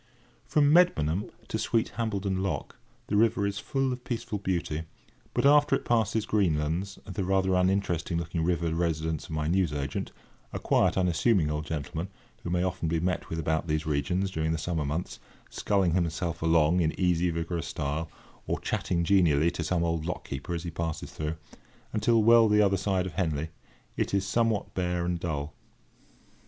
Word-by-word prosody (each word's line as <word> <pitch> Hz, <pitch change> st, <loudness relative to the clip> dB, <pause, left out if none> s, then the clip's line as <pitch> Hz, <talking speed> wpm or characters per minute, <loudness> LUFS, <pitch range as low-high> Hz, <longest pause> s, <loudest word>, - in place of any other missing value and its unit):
From 145 Hz, -1 st, +4 dB
Medmenham 95 Hz, -, +3 dB, 0.2 s
to -, -, -2 dB
sweet 115 Hz, -1 st, +1 dB
Hambledon 100 Hz, -4 st, -2 dB
Lock 95 Hz, -, -3 dB, 0.3 s
the 105 Hz, -, -2 dB
river 105 Hz, -1 st, +3 dB
is 100 Hz, 0 st, -2 dB
full 135 Hz, 0 st, -1 dB
of 125 Hz, 0 st, -8 dB
peaceful 115 Hz, -4 st, -3 dB
beauty, 85 Hz, -5 st, -2 dB, 0.5 s
but, 120 Hz, -, 0 dB
after 145 Hz, +1 st, +6 dB
it -, -, -4 dB
passes 110 Hz, -2 st, +1 dB
Greenlands, 90 Hz, -1 st, 0 dB
the 95 Hz, 0 st, -3 dB
rather 95 Hz, 0 st, +2 dB
uninteresting 90 Hz, -2 st, +1 dB
looking 85 Hz, 0 st, -2 dB
river 85 Hz, -1 st, 0 dB
residence 80 Hz, -2 st, -1 dB
of -, -, -14 dB
my 80 Hz, -1 st, -2 dB
newsagent—a 75 Hz, -6 st, -3 dB
quiet -, -, +2 dB
unassuming 90 Hz, -2 st, +2 dB
old 75 Hz, +1 st, -3 dB
gentleman, 80 Hz, +3 st, -3 dB, 0.3 s
who -, -, -5 dB
may 90 Hz, 0 st, +1 dB
often 90 Hz, -2 st, -2 dB
be 80 Hz, +1 st, +1 dB
met 90 Hz, +1 st, -2 dB
with 80 Hz, -, -3 dB
about 80 Hz, +1 st, -1 dB
these 75 Hz, 0 st, -1 dB
regions, 90 Hz, +6 st, 0 dB
during 80 Hz, -2 st, -1 dB
the -, -, 0 dB
summer 80 Hz, -1 st, -2 dB
months, 80 Hz, +5 st, -3 dB, 0.3 s
sculling 95 Hz, -5 st, +1 dB
himself 85 Hz, -1 st, -1 dB
along 80 Hz, +1 st, +3 dB
in 80 Hz, -2 st, -1 dB
easy 90 Hz, -1 st, +2 dB
vigorous 85 Hz, 0 st, -3 dB
style, 75 Hz, +2 st, -3 dB, 0.4 s
or -, -, -1 dB
chatting 85 Hz, -1 st, -1 dB
genially 85 Hz, -4 st, +4 dB
to 85 Hz, -1 st, -4 dB
some 85 Hz, +1 st, 0 dB
old 85 Hz, -1 st, -1 dB
lock 90 Hz, -, -4 dB
keeper, 70 Hz, +5 st, -4 dB
as 85 Hz, -, -4 dB
he 85 Hz, -, -4 dB
passes 80 Hz, -1 st, -4 dB
through—until 95 Hz, +8 st, -2 dB
well 115 Hz, 0 st, +6 dB
the 105 Hz, 0 st, +4 dB
other 100 Hz, -2 st, +4 dB
side 95 Hz, -1 st, 0 dB
of 90 Hz, -, -5 dB
Henley, 80 Hz, -3 st, -1 dB, 0.5 s
it -, -, -1 dB
is 95 Hz, -1 st, +1 dB
somewhat 115 Hz, 0 st, 0 dB
bare 90 Hz, -1 st, -1 dB
and 90 Hz, -1 st, -1 dB
dull. 75 Hz, -3 st, -3 dB
85 Hz, 170 wpm, -28 LUFS, 80-100 Hz, 0.5 s, after